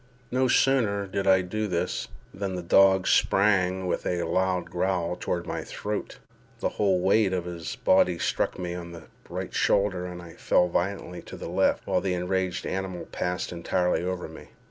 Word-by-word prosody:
No 130 Hz, +1 st, +2 dB
sooner 115 Hz, -7 st, +2 dB
did 95 Hz, 0 st, -3 dB
I 95 Hz, -1 st, +6 dB
do 110 Hz, +4 st, -2 dB
this, 90 Hz, -1 st, -2 dB, 0.3 s
than 95 Hz, -2 st, -3 dB
the 90 Hz, -, -4 dB
dog 95 Hz, +2 st, +5 dB
sprang 95 Hz, -2 st, +3 dB
with 90 Hz, -, -1 dB
a 90 Hz, -1 st, 0 dB
loud 95 Hz, 0 st, 0 dB
growl 90 Hz, -1 st, 0 dB
toward 85 Hz, -1 st, -3 dB
my -, -, -4 dB
throat. 105 Hz, 0 st, -5 dB, 0.4 s
The -, -, 0 dB
whole 95 Hz, -3 st, +1 dB
weight 95 Hz, +1 st, +3 dB
of 90 Hz, -2 st, -1 dB
his 85 Hz, -2 st, -5 dB
body 90 Hz, -2 st, +3 dB
struck -, -, -1 dB
me 90 Hz, -1 st, -4 dB
on 85 Hz, -1 st, -7 dB
the 85 Hz, -, -10 dB, 0.3 s
right -, -, -5 dB
shoulder, 95 Hz, -3 st, +1 dB
and 90 Hz, -1 st, -7 dB
I 85 Hz, -1 st, -11 dB
fell 90 Hz, -, +2 dB
violently 90 Hz, 0 st, -2 dB
to -, -, -10 dB
the -, -, -6 dB
left, -, -, +1 dB
while -, -, +1 dB
the 95 Hz, -2 st, -1 dB
enraged 90 Hz, +1 st, -1 dB
animal 95 Hz, -2 st, -3 dB
passed 90 Hz, 0 st, -2 dB
entirely 90 Hz, +1 st, 0 dB
over 90 Hz, 0 st, -3 dB
me. -, -, -12 dB
90 Hz, 180 wpm, -27 LUFS, 90-95 Hz, 0.4 s, I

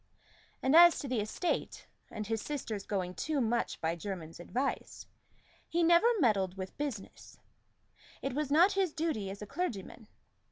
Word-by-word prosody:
And 265 Hz, +3 st, +3 dB
as 345 Hz, 0 st, +9 dB
to 285 Hz, -, -4 dB
the 250 Hz, -3 st, 0 dB
estate, 215 Hz, -, -2 dB, 0.2 s
and 215 Hz, -1 st, -5 dB
his 225 Hz, 0 st, -2 dB
sister's 225 Hz, -8 st, -4 dB
going 185 Hz, -3 st, -2 dB
too 290 Hz, -, -2 dB
much 235 Hz, -1 st, 0 dB
by 165 Hz, +1 st, -1 dB
Jermyn's 170 Hz, -3 st, -6 dB
advice, 255 Hz, +10 st, -3 dB, 0.6 s
he 340 Hz, +1 st, +1 dB
never 340 Hz, +6 st, +6 dB
meddled 195 Hz, -, +2 dB
with 185 Hz, 0 st, -6 dB
business: 270 Hz, -9 st, -6 dB, 0.9 s
it 275 Hz, -, -2 dB
was 295 Hz, 0 st, -1 dB
not 340 Hz, +7 st, +5 dB
his 385 Hz, -5 st, 0 dB
duty 305 Hz, -, -2 dB
as 200 Hz, +2 st, -7 dB
a -, -, -5 dB
clergyman. 220 Hz, -, -5 dB
235 Hz, 155 wpm, -32 LUFS, 195-310 Hz, 0.9 s, as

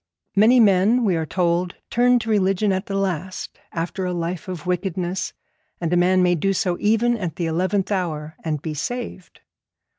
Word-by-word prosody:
Many 225 Hz, +5 st, +6 dB
men, 210 Hz, +3 st, +4 dB
we 190 Hz, -4 st, +2 dB
are 160 Hz, -1 st, -2 dB
told, 175 Hz, 0 st, 0 dB, 0.2 s
turn 245 Hz, +1 st, +4 dB
to 225 Hz, -1 st, -4 dB
religion 195 Hz, 0 st, +2 dB
at 190 Hz, +1 st, -2 dB
the 195 Hz, -, -3 dB
last 185 Hz, -2 st, -3 dB
after 170 Hz, +3 st, -3 dB
a 180 Hz, -1 st, -1 dB
life 175 Hz, +4 st, -3 dB
of 180 Hz, -4 st, -6 dB
wickedness, 180 Hz, 0 st, -2 dB, 0.5 s
and 170 Hz, 0 st, -1 dB
a -, -, +4 dB
man 180 Hz, +1 st, +4 dB
may 180 Hz, 0 st, +4 dB
do 195 Hz, +4 st, +1 dB
so 180 Hz, -1 st, 0 dB
even 225 Hz, +3 st, +2 dB
at 180 Hz, -8 st, -4 dB
the 175 Hz, -, -2 dB
eleventh 185 Hz, +5 st, 0 dB
hour 160 Hz, -5 st, -2 dB
and 155 Hz, -3 st, -2 dB
be 160 Hz, -, -3 dB
saved. 215 Hz, -, -5 dB
185 Hz, 180 wpm, -22 LUFS, 175-200 Hz, 0.5 s, Many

